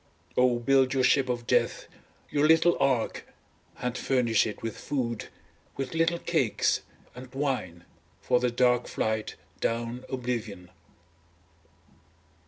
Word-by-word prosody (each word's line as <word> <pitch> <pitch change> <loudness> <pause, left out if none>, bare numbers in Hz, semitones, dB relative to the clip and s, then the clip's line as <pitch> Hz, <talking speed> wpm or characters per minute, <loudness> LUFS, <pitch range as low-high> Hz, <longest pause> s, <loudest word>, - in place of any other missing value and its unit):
Oh 125 -1 +4
build 130 +2 +3
your 130 - +2
ship 135 0 +3
of 120 -1 -2
death, - - +1 0.4
your 150 +1 +3
little 165 +2 +5
ark 130 -5 0 0.5
and 125 0 -2
furnish 120 -6 +2
it 105 - -7
with 115 -1 -3
food, 120 -5 -3 0.5
with 135 +1 -4
little 165 +1 +2
cakes, - - +1 0.3
and 125 0 -11
wine 125 -12 -2 0.3
for 125 - +2
the 125 0 +1
dark 125 0 +2
flight 110 0 -2 0.2
down 120 +2 -2
oblivion. 120 -8 -4
125 Hz, 120 wpm, -28 LUFS, 115-135 Hz, 0.5 s, little